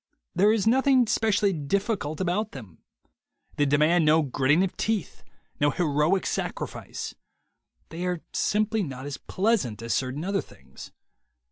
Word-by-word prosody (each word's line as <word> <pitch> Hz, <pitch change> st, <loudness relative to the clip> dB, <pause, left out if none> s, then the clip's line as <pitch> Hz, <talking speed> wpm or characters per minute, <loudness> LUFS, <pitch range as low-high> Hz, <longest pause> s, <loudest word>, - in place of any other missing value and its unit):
There 205 Hz, +3 st, +4 dB
is 220 Hz, -3 st, +1 dB
nothing 260 Hz, +2 st, +4 dB
specially 210 Hz, -3 st, +2 dB
difficult 160 Hz, 0 st, -2 dB
about 190 Hz, +4 st, -1 dB
them. 105 Hz, -, -11 dB, 0.8 s
They 145 Hz, -, +2 dB
demand 155 Hz, +4 st, +3 dB
no 155 Hz, +1 st, +4 dB
gritting 145 Hz, +5 st, +2 dB
of 190 Hz, -, -2 dB
teeth, 220 Hz, -5 st, -2 dB, 0.4 s
no 145 Hz, -, +4 dB
heroic 155 Hz, +4 st, +1 dB
sacrifice. -, -, -4 dB, 0.8 s
They 175 Hz, +3 st, -4 dB
are 180 Hz, -2 st, -2 dB
simply 215 Hz, +1 st, +1 dB
not 135 Hz, -6 st, -5 dB
as 145 Hz, -2 st, -5 dB
pleasant 185 Hz, -, 0 dB
as 115 Hz, -2 st, -1 dB
certain 130 Hz, +7 st, -2 dB
other 195 Hz, 0 st, 0 dB
things. -, -, -14 dB
175 Hz, 135 wpm, -26 LUFS, 145-210 Hz, 0.8 s, There